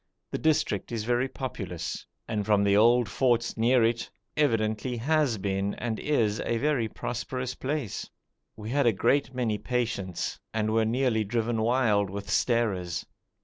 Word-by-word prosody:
The - - -2
district 150 -11 +1
is 115 -2 -2
very 120 +3 +1
populous, 95 -12 -5 0.2
and 110 -2 -1
from 105 -1 +3
the 100 0 +3
old 120 +2 +5
forts 120 -3 +1
near 120 +2 +4
it 115 +1 0 0.3
evidently 115 -3 +1
has 145 -1 +2
been 100 0 -1
and 110 -1 -3
is 115 -8 +1
a 115 - -1
very 135 -3 +1
prosperous 125 +3 -4
place. 135 -6 -3 0.5
We 110 +1 -7
had 140 -1 +3
a 115 - +4
great 130 +6 +1
many 115 -4 0
patients, 115 -8 -2 0.2
and 110 -1 +1
were 110 0 +3
nearly 115 -1 +1
driven 115 +1 -1
wild 110 -4 +2
with 100 +1 -6
starers. 95 -8 +1
115 Hz, 150 wpm, -28 LUFS, 105-125 Hz, 0.5 s, old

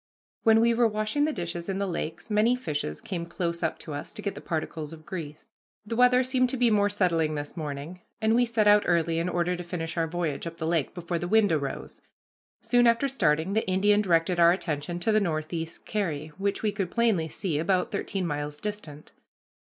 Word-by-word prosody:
When 225 -1 +5
we 235 0 +4
were 235 0 +4
washing 215 +7 0
the 310 - 0
dishes 170 - -5
in 195 - -1
the 200 - 0
lakes, 170 +2 -5
many 215 +4 +4
fishes 145 - -4
came 170 -2 -4
close 170 0 -3
up 160 - -1
to 155 - -8
us 145 - -7
to 210 - -7
get 200 - -2
the - - -9
particles 160 -1 -4
of 155 -1 -13
grease. 155 -5 -7 0.4
The 230 - -4
weather 250 +1 +5
seemed 255 0 +1
to 265 - -1
be 240 -2 +3
more 205 -1 +3
settled 165 -6 +1
this 145 0 -5
morning, 155 +2 -6 0.2
and 220 0 +2
we 245 +1 +3
set 225 -2 +2
out 210 0 +7
early 165 -1 +2
in 170 +2 -1
order 175 0 0
to 180 - -6
finish 170 -1 -5
our 165 -1 +1
voyage 170 -2 -3
up 165 0 -7
the 160 - -3
lake 165 -4 0
before 170 -1 -3
the 175 - -3
wind 215 0 +4
arose. 140 -4 -3 0.6
Soon 245 -1 +3
after 235 +4 +3
starting, 175 - +1
the 220 -1 0
Indian 205 +3 +3
directed 175 -2 +2
our 170 0 +7
attention 170 -2 -2
to 220 - +2
the 215 - +4
Northeast 165 -1 -3
Carry, 160 -8 -2
which 200 +2 -1
we 215 - +2
could 195 -3 -3
plainly 220 -9 +1
see, 160 -1 -2
about 180 +2 +1
thirteen 195 -2 -2
miles 150 -1 -3
distant. 185 -8 -7
175 Hz, 215 wpm, -27 LUFS, 160-210 Hz, 0.6 s, out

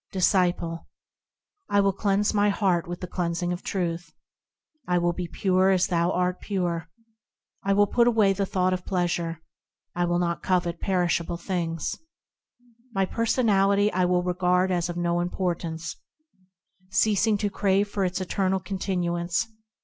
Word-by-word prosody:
Disciple. 180 -3 +1 0.8
I 200 - +3
will 200 -1 +3
cleanse 200 +1 +1
my 205 0 +3
heart 190 -5 +1
with 175 0 -6
the 180 - -4
cleansing 175 0 -2
of 175 - -6
Truth; 175 -2 -3 0.7
I 180 0 +2
will 175 0 +1
be 175 0 -4
pure 185 +2 +2
as 185 -2 +3
thou 170 -2 +1
art 180 0 0
pure; 175 -5 -2 0.7
I 195 - +2
will 205 +1 +5
put 235 +4 +2
away 215 -4 +4
the 195 0 -1
thought 185 0 +1
of 180 -1 -3
pleasure; 170 -3 -2 0.5
I 175 0 0
will 175 0 +1
not 170 -1 -1
covet 175 -2 0
perishable 175 -2 0
things; 170 -3 -3 1.0
My 195 0 +2
personality 205 -3 +2
I 185 0 +2
will 180 0 +2
regard 180 +1 +1
as 175 -1 0
of 175 - -4
no 175 0 0
importance, 175 -2 -3 0.9
Ceasing 210 +1 +2
to 205 0 -1
crave 200 0 +2
for 200 -1 -2
its 180 0 -1
eternal 190 0 0
continuance. 180 -2 -1
180 Hz, 150 wpm, -26 LUFS, 175-195 Hz, 1.0 s, will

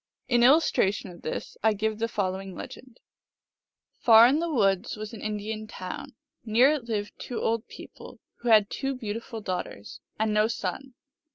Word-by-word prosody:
In 240 -1 +3
illustration 240 - +3
of 175 - -14
this - - -5
I 220 0 +3
give 215 +1 -2
the 230 - 0
following 190 -3 -3
legend: 255 -1 -10 1.0
Far 225 -1 +8
in 270 +5 +4
the 335 0 -2
woods 195 -5 +1
was 215 +1 -7
an 220 - -8
Indian 215 +1 -4
town; 210 +7 -7 0.3
near 240 +5 +4
it 295 -6 -2
lived 210 -3 -3
two 245 - -5
old 225 -1 -1
people, - - -12 0.2
who 240 - -3
had 215 -2 +6
two 270 0 -2
beautiful 225 0 -6
daughters, 120 - -5 0.2
and 220 0 0
no 210 +1 +3
son. 235 +5 -5
220 Hz, 165 wpm, -27 LUFS, 205-240 Hz, 1.0 s, Far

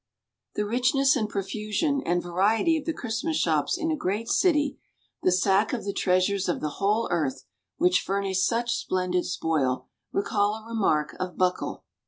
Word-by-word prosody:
The 210 - 0
richness 265 +5 +3
and 215 -5 -1
profusion 215 - -1
and 175 0 0
variety 205 - +2
of 310 - -3
the 330 - 0
Christmas 265 +3 -2
shops - - +1
in 320 0 -1
a - - +1
great 215 -2 -2
city, 295 -6 +2 0.4
the 185 - +3
sack 195 +4 +2
of 235 - -3
the 200 - -2
treasures 185 0 +1
of - - 0
the 150 -1 -4
whole 210 +3 +2
earth, 135 -6 -1 0.3
which 180 0 +3
furnish 195 -1 0
such 235 +4 +1
splendid 180 -1 -1
spoil, 140 -6 -1 0.2
recall 205 +1 +1
a 220 0 -10
remark 195 -10 0
of 185 -1 -4
Buckle. 180 -1 -1
200 Hz, 165 wpm, -26 LUFS, 180-230 Hz, 0.4 s, richness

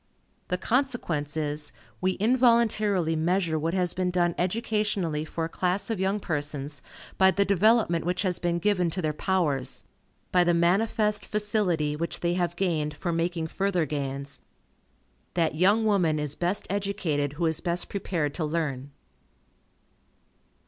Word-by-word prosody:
The 180 - -1
consequence 180 - -1
is, 150 -1 -3 0.3
we 185 0 +2
involuntarily 215 -7 +3
measure 165 0 +1
what 165 +3 -1
has 180 -2 +1
been 185 -1 0
done 175 -1 +1
educationally 190 -5 -1
for 165 +1 -3
a - - -2
class 185 +5 -1
of 220 - -2
young 195 +2 +1
persons, 145 -4 -4 0.4
by 190 0 +7
the 200 +1 +2
development 200 -3 +3
which 180 +3 -1
has 185 -3 -1
been 175 -1 0
given 180 -1 +1
to 185 +3 -3
their 155 -1 0
powers, 150 -7 -1 0.5
by 180 -1 +5
the 175 -1 +3
manifest 210 +5 +2
facility 200 -8 0
which 165 +2 -4
they 175 0 +1
have 175 -1 -1
gained 155 -5 -1
for 170 - -3
making 165 0 -1
further 180 0 0
gains. 140 -1 -4 0.9
That 165 -4 +2
young 200 +7 +3
woman 180 -7 +2
is 150 -1 -2
best 180 +4 -1
educated 175 -8 -1
who 170 +3 -1
is 160 0 +1
best 175 0 -1
prepared 170 -7 -2
to 165 - -3
learn. 150 -4 -2
175 Hz, 150 wpm, -27 LUFS, 155-195 Hz, 0.9 s, by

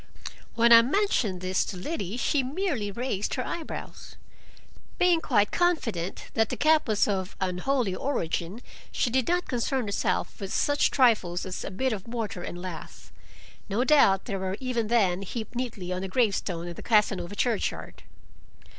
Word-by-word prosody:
When 235 0 +6
I 230 - +10
mentioned 245 - 0
this 185 0 +1
to 190 - -6
Liddy 205 - -4
she 275 +3 +1
merely 270 - -2
raised 210 -1 -2
her 255 - -2
eyebrows. 330 -3 -7 0.8
Being 355 -2 +3
quite 210 -9 +2
confident 230 - -1
that 225 -1 +2
the - - -2
gap 310 -1 +3
was 215 -2 +2
of 190 -2 -2
unholy 190 +4 0
origin, 185 - -2 0.3
she 240 - 0
did 260 0 +1
not 355 +1 +1
concern 250 +1 -1
herself 200 - -1
with 195 -1 -4
such 290 +5 +2
trifles 210 -9 +2
as 185 - -5
a - - -4
bit 245 +6 -1
of 195 -1 -6
mortar 225 -5 -4
and 175 0 -6
lath. 180 -3 -8 0.6
No 210 +5 +1
doubt 265 -10 +4
they 205 - -3
were 190 +1 -3
even 250 -4 -1
then 195 -6 +2
heaped 220 +3 -6
neatly 230 -8 -4
on 185 +1 -4
a - - -2
gravestone 190 -6 0
in 175 - -5
the - - -10
Casanova 205 -4 +1
churchyard! 230 0 -2
220 Hz, 165 wpm, -27 LUFS, 190-255 Hz, 0.8 s, I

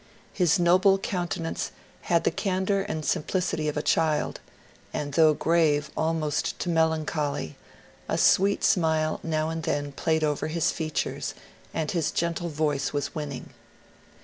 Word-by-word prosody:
His 175 -4 +3
noble 185 +3 +4
countenance 175 -4 -3 0.4
had 170 -1 +3
the - - +2
can 190 +2 -1
dour 200 0 +2
and 160 -6 -4
simplicity 165 -2 -1
of 150 - -2
a 150 - -1
child, 155 -2 +1 0.5
and 145 -1 -4
though 155 -1 +5
grave 155 -2 +2
almost 160 -2 -1
to 180 - -2
melancholy, 155 - 0 0.5
a - - 0
sweet 200 +2 +4
smile 160 -3 +2
now 155 -1 -1
and 165 0 -3
then 145 -3 -2
played 160 +3 0
over 150 -1 0
his 160 +1 +1
fea 160 -2 -3
tures, - - -3 0.4
and 160 -2 -2
his 165 -3 0
gentle 170 +1 -1
voice 145 -3 0
was 145 -1 -2
winning. 145 -4 -6
160 Hz, 150 wpm, -26 LUFS, 150-170 Hz, 0.5 s, though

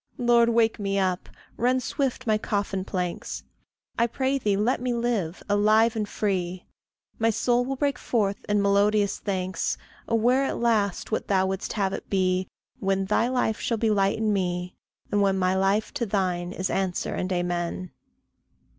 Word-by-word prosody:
Lord, 235 -1 +4
wake 225 -1 +2
me 195 -1 -1
up; 185 -2 0 0.3
rend 250 +2 +2
swift 260 -2 -2
my 215 -2 +2
coffin 200 -2 -2
planks; 180 -2 -4 0.6
I 235 - +4
pray 265 +3 0
thee, 205 -5 +1
let 230 +5 +1
me 250 -1 -1
live 225 -8 -1
alive 215 +3 +4
and 210 -2 -2
free. 185 -3 -2 0.5
My 225 0 +3
soul 240 +2 +2
will 270 +2 -3
break 280 -1 0
forth 205 -4 0
in 205 -1 +2
melodious 200 +1 +2
thanks, 185 -2 -2 0.3
Aware 245 +4 +3
at - - -2
last 215 -5 0
what 220 - -1
thou 190 -1 +3
wouldst 190 0 -3
have 195 -3 0
it - - -6
be, 185 -1 +1 0.3
When 195 0 0
thy 210 +4 +2
life 250 -4 0
shall 230 - 0
be 220 0 +1
light 195 -1 +2
in 215 -1 +1
me, 180 -2 -1 0.4
and 205 0 +2
when 195 -1 +2
My 185 0 +2
life 195 +3 +1
to 235 - -2
thine 180 -3 -1
is 185 0 -2
answer 190 -2 -1
and 185 - -2
amen. 175 0 -2
205 Hz, 170 wpm, -26 LUFS, 190-230 Hz, 0.6 s, Lord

